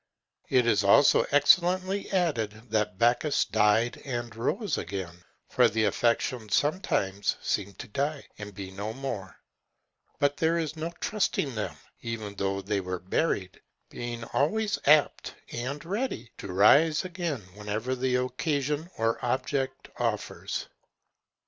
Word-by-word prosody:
It 125 Hz, -2 st, +4 dB
is 105 Hz, -3 st, +3 dB
also 100 Hz, +8 st, +5 dB
excellently 185 Hz, +6 st, +3 dB
added, 120 Hz, -, -1 dB
that 105 Hz, -2 st, 0 dB
Bacchus 120 Hz, +7 st, +3 dB
died 110 Hz, +3 st, +2 dB
and 120 Hz, -4 st, -4 dB
rose 155 Hz, -, -1 dB
again; 90 Hz, -1 st, -6 dB, 0.2 s
for 125 Hz, -2 st, +4 dB
the 110 Hz, +1 st, 0 dB
affections 115 Hz, +1 st, +1 dB
sometimes 105 Hz, -, 0 dB
seem 100 Hz, -1 st, -2 dB
to -, -, -8 dB
die 140 Hz, +5 st, -2 dB
and 105 Hz, 0 st, -7 dB
be 95 Hz, -1 st, -7 dB
no 100 Hz, +3 st, -5 dB
more; 115 Hz, -8 st, -5 dB, 0.8 s
but 145 Hz, 0 st, +1 dB
there 165 Hz, +1 st, +2 dB
is 160 Hz, -2 st, -2 dB
no 160 Hz, +2 st, -4 dB
trusting 185 Hz, -9 st, 0 dB
them, 105 Hz, -7 st, -3 dB, 0.3 s
even 110 Hz, -3 st, -5 dB
though 100 Hz, 0 st, -2 dB
they 100 Hz, +1 st, 0 dB
were 90 Hz, 0 st, -3 dB
buried, 95 Hz, -, -1 dB, 0.3 s
being 120 Hz, -1 st, -5 dB
always 210 Hz, +8 st, +1 dB
apt 150 Hz, 0 st, +4 dB, 0.2 s
and 135 Hz, +6 st, -4 dB
ready 195 Hz, -, -3 dB
to 100 Hz, -, -6 dB
rise 150 Hz, -, +5 dB
again 170 Hz, -, -3 dB
whenever 105 Hz, +4 st, -3 dB
the 130 Hz, 0 st, 0 dB
occasion 145 Hz, +5 st, -1 dB
or 115 Hz, +1 st, 0 dB
object 130 Hz, +2 st, -2 dB
offers. -, -, -2 dB
120 Hz, 130 wpm, -28 LUFS, 105-150 Hz, 0.8 s, also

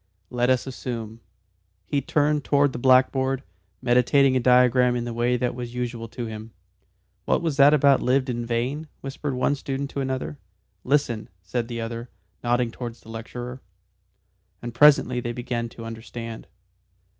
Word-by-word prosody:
Let 125 Hz, 0 st, +1 dB
us 130 Hz, -2 st, +2 dB
assume 115 Hz, -4 st, -6 dB, 0.3 s
" 95 Hz, +1 st, -45 dB
He 140 Hz, -, +3 dB
turned 150 Hz, +1 st, +1 dB
towards 145 Hz, -1 st, +2 dB
the -, -, -4 dB
blackboard, 130 Hz, +1 st, +3 dB, 0.4 s
meditating 130 Hz, +2 st, +4 dB
a -, -, +4 dB
diagram 125 Hz, 0 st, +4 dB
in 120 Hz, -1 st, -2 dB
the 120 Hz, -, -4 dB
way 120 Hz, +1 st, +1 dB
that 125 Hz, 0 st, -1 dB
was 120 Hz, -1 st, -7 dB
usual 120 Hz, -2 st, -3 dB
to 120 Hz, +2 st, -6 dB
him. 110 Hz, 0 st, -8 dB, 0.7 s
"What -, -, +1 dB
was 160 Hz, -4 st, -1 dB
that 140 Hz, +1 st, +7 dB
about 140 Hz, -2 st, +4 dB
'lived 130 Hz, +1 st, +2 dB
in 120 Hz, -2 st, -2 dB
vain?'" 125 Hz, +7 st, -2 dB
whispered 135 Hz, 0 st, -4 dB
one 130 Hz, +3 st, +1 dB
student 140 Hz, 0 st, -4 dB
to 140 Hz, -, -3 dB
another. 130 Hz, +2 st, -3 dB, 0.4 s
"Listen," 125 Hz, -5 st, 0 dB
said 115 Hz, +6 st, -2 dB
the 120 Hz, -1 st, -4 dB
other, 115 Hz, +1 st, -5 dB, 0.3 s
nodding 120 Hz, 0 st, +1 dB
towards 120 Hz, -1 st, -7 dB
the -, -, -15 dB
lecturer. 120 Hz, +3 st, -7 dB, 1.0 s
And 120 Hz, -1 st, -6 dB
presently 130 Hz, -2 st, +5 dB
they 120 Hz, 0 st, -3 dB
began 120 Hz, -1 st, -3 dB
to 115 Hz, 0 st, -10 dB
understand. 115 Hz, 0 st, -7 dB
125 Hz, 160 wpm, -24 LUFS, 115-135 Hz, 1.0 s, that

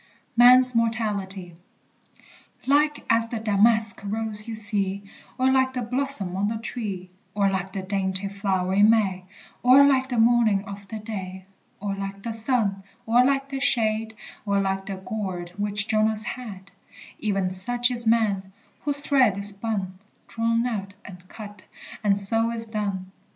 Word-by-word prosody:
MAN'S 250 Hz, +1 st, +7 dB
MORTALITY. 205 Hz, -6 st, -2 dB, 1.1 s
Like 295 Hz, +2 st, +1 dB
as 230 Hz, 0 st, +2 dB
the 230 Hz, -, -4 dB
damask 220 Hz, 0 st, +3 dB
rose 215 Hz, +1 st, -3 dB
you 225 Hz, -, -5 dB
see, 200 Hz, -2 st, -2 dB, 0.3 s
Or 260 Hz, 0 st, +2 dB
like 260 Hz, 0 st, +2 dB
the 250 Hz, -1 st, -3 dB
blossom 250 Hz, -6 st, 0 dB
on 200 Hz, +2 st, -1 dB
the 220 Hz, +1 st, -3 dB
tree, 200 Hz, -6 st, -6 dB, 0.2 s
Or 200 Hz, -1 st, +1 dB
like 190 Hz, 0 st, -3 dB
the 195 Hz, -, -5 dB
dainty 190 Hz, 0 st, -2 dB
flower 195 Hz, -2 st, -2 dB
in 205 Hz, +2 st, +5 dB
May, 195 Hz, -5 st, +1 dB, 0.4 s
Or 255 Hz, +3 st, +6 dB
like 265 Hz, -2 st, +2 dB
the 245 Hz, -, -3 dB
morning 225 Hz, -3 st, +3 dB
of 200 Hz, -1 st, -10 dB
the 220 Hz, -, -7 dB
day, 190 Hz, -3 st, -7 dB, 0.3 s
Or 200 Hz, 0 st, -3 dB
like 195 Hz, 0 st, -7 dB
the 230 Hz, -, -4 dB
sun, 220 Hz, -4 st, 0 dB, 0.2 s
or 235 Hz, +2 st, +4 dB
like 275 Hz, +1 st, 0 dB
the 270 Hz, -1 st, -4 dB
shade, 220 Hz, -3 st, 0 dB, 0.3 s
Or 200 Hz, -1 st, 0 dB
like 195 Hz, 0 st, -2 dB
the 195 Hz, -, -4 dB
gourd 185 Hz, -3 st, -6 dB
which 205 Hz, +1 st, -1 dB
Jonas 215 Hz, 0 st, 0 dB
had, 205 Hz, -6 st, -8 dB, 0.5 s
E'en 195 Hz, -3 st, 0 dB
such 240 Hz, +7 st, +3 dB
is 235 Hz, -2 st, +2 dB
man; 205 Hz, -4 st, +1 dB, 0.3 s
whose 285 Hz, 0 st, +4 dB
thread 260 Hz, -9 st, +2 dB
is 200 Hz, 0 st, +5 dB
spun, 200 Hz, -3 st, -3 dB, 0.3 s
Drawn 230 Hz, +1 st, -1 dB
out, 200 Hz, -5 st, -4 dB
and 180 Hz, -1 st, -13 dB
cut, 205 Hz, -1 st, -12 dB, 0.4 s
and 200 Hz, -1 st, +2 dB
so 225 Hz, +3 st, +3 dB
is 230 Hz, -1 st, -1 dB
done. 200 Hz, -4 st, -4 dB
210 Hz, 155 wpm, -24 LUFS, 195-230 Hz, 1.1 s, MAN'S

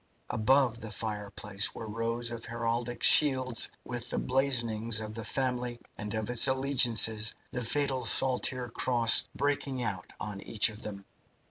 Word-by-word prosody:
Above 120 Hz, +1 st, +1 dB
the 110 Hz, -, -7 dB
fireplace 105 Hz, -1 st, -2 dB
were 110 Hz, -, -7 dB
rows 115 Hz, +2 st, -3 dB
of 115 Hz, -1 st, -7 dB
heraldic 115 Hz, +1 st, -4 dB
shields 130 Hz, -5 st, +5 dB, 0.2 s
with 120 Hz, -1 st, -5 dB
the -, -, -2 dB
blazonings 115 Hz, -4 st, 0 dB
of 110 Hz, 0 st, -7 dB
the 115 Hz, 0 st, -7 dB
family 125 Hz, -1 st, -3 dB, 0.2 s
and 105 Hz, 0 st, -5 dB
of 110 Hz, -1 st, -3 dB
its 120 Hz, +2 st, +4 dB
alliances, 120 Hz, -5 st, +3 dB, 0.2 s
the 125 Hz, -, -4 dB
fatal 135 Hz, +1 st, 0 dB
saltire 125 Hz, +1 st, +2 dB
cross 115 Hz, 0 st, +3 dB
breaking 140 Hz, -2 st, -2 dB
out 95 Hz, -5 st, -5 dB
on 105 Hz, -2 st, -6 dB
each 110 Hz, 0 st, +1 dB
of 110 Hz, +1 st, -11 dB
them. 100 Hz, -3 st, -8 dB
115 Hz, 145 wpm, -29 LUFS, 110-130 Hz, 0.2 s, shields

